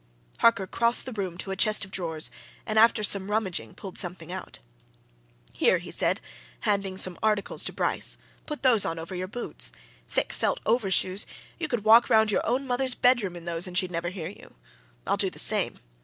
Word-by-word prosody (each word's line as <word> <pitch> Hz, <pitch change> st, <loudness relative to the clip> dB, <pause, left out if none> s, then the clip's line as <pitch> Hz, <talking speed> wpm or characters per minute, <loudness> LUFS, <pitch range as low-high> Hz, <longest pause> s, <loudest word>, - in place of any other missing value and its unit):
Harker 230 Hz, -4 st, +4 dB
crossed 235 Hz, +5 st, +1 dB
the 260 Hz, -, -6 dB
room 190 Hz, -5 st, -4 dB
to 195 Hz, -, -5 dB
a -, -, -2 dB
chest 215 Hz, +1 st, +2 dB
of 190 Hz, -, -16 dB
drawers, 165 Hz, -4 st, -1 dB, 0.3 s
and 215 Hz, 0 st, +1 dB
after 225 Hz, -1 st, +5 dB
some 200 Hz, -1 st, +1 dB
rummaging 190 Hz, -, -2 dB
pulled 190 Hz, -2 st, -6 dB
something 175 Hz, -2 st, -4 dB
out. 190 Hz, -, -7 dB, 1.0 s
"Here!" -, -, +3 dB
he -, -, -9 dB
said, -, -, +1 dB, 0.4 s
handing 195 Hz, -2 st, -1 dB
some 185 Hz, -2 st, -1 dB
articles 215 Hz, -2 st, 0 dB
to -, -, -3 dB
Bryce. -, -, +1 dB, 0.3 s
"Put 300 Hz, -2 st, -6 dB
those 240 Hz, -6 st, +5 dB
on 165 Hz, -, -2 dB
over 165 Hz, +3 st, -7 dB
your 185 Hz, 0 st, -4 dB
boots. 240 Hz, +5 st, -4 dB, 0.4 s
Thick -, -, 0 dB
felt -, -, -1 dB
overshoes 195 Hz, -4 st, +2 dB, 0.3 s
you 325 Hz, -, -2 dB
could 240 Hz, -7 st, -2 dB
walk 225 Hz, +2 st, +6 dB
round 220 Hz, -2 st, +4 dB
your -, -, +1 dB
own 255 Hz, +4 st, 0 dB
mother's 255 Hz, 0 st, +1 dB
bedroom 240 Hz, -8 st, +2 dB
in 170 Hz, -1 st, -10 dB
those 170 Hz, +1 st, -2 dB
and 180 Hz, 0 st, -4 dB
she'd 185 Hz, -1 st, 0 dB
never 170 Hz, 0 st, -2 dB
hear 175 Hz, -3 st, -6 dB
you. 200 Hz, -, -15 dB, 0.5 s
I'll -, -, 0 dB
do -, -, +2 dB
the -, -, -13 dB
same. -, -, +6 dB
200 Hz, 195 wpm, -26 LUFS, 180-230 Hz, 1.0 s, walk